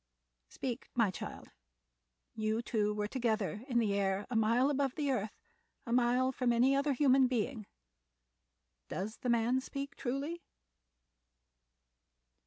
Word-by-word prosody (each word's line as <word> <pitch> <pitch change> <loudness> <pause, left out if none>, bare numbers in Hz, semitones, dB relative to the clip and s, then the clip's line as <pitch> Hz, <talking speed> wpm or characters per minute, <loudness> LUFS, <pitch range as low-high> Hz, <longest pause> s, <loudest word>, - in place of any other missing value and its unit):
Speak, 250 -2 -5
my 230 -5 +3
child; - - -8 0.8
you 220 +1 -1
two 210 -3 0
were 210 0 -2
together 220 -3 -1
in 245 -4 0
the 220 -4 +2
air 195 0 0
a - - -2
mile 230 +5 +3
above 275 -2 0
the 290 -3 0
earth, 215 -4 -2 0.5
a 235 - -2
mile 250 +1 +3
from 250 -1 0
any 250 +4 +4
other 280 +1 +2
human 265 -1 +4
being. 240 -2 -2 1.2
Does 210 +4 -4
the 250 - -3
man 235 +2 +2
speak 280 +1 -6
truly?" 280 +7 -3
240 Hz, 130 wpm, -33 LUFS, 215-265 Hz, 1.2 s, any